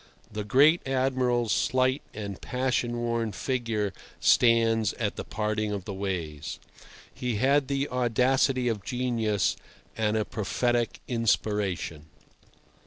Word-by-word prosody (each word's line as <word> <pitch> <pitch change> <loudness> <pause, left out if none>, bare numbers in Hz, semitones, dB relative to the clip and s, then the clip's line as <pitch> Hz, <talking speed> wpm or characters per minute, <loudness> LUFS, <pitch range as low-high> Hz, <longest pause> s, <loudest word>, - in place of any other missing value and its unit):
The 105 0 -4
great 145 +10 +5
Admiral's 130 -3 +1
slight 130 +2 +1
and 100 -3 -6
passion 125 -2 -1
worn 115 -2 -1
figure 115 -3 -2 0.3
stands 115 -2 +4
at 105 -3 -2
the - - -5
parting 105 0 -2
of 100 -3 -4
the 100 - -5
ways. 90 -7 -4 0.6
He 125 -3 -2
had 135 +5 +3
the 140 +1 0
audacity 125 +1 +2
of 110 -4 -1
genius, 115 -5 0 0.4
and 110 -1 +1
a 110 - 0
prophetic 120 +2 -1
inspiration. 105 - -1
115 Hz, 115 wpm, -27 LUFS, 105-125 Hz, 0.6 s, great